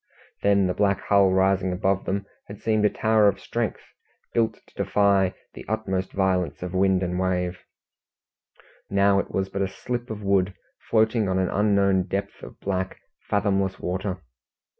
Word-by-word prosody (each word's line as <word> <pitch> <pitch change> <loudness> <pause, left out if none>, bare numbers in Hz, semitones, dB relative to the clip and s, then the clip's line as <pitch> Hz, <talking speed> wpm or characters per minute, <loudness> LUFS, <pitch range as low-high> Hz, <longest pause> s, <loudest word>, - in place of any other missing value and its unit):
Then 100 -1 +3
the 90 - 0
black 100 0 +1
hull 100 -1 +4
rising 95 0 +2
above 95 +1 0
them, 100 +1 -2 0.2
had 100 0 -9
seemed 110 -1 +1
a - - +5
tower 110 -1 +3
of 100 -1 +1
strength, 120 -2 -3 0.5
built 115 -2 +1
to - - -26
defy 100 -2 +2 0.2
the - - -9
utmost 95 -4 -2
violence 95 -3 0
of 90 0 -5
wind 95 0 +2
and 90 0 -2
wave; 90 -1 -1 1.3
now 100 0 +3
it - - -3
was 95 0 -2
but 100 - -3
a 95 - +1
slip 120 +5 -5
of 105 -1 -6
wood 95 -1 +1 0.3
floating 110 -2 +2
on 95 - +1
an 95 -1 +1
unknown 100 -2 +2
depth 100 +1 -4
of - - -11
black, 95 -1 -2 0.3
fathomless 100 -2 +1
water. 90 0 -3
95 Hz, 160 wpm, -25 LUFS, 95-100 Hz, 1.3 s, a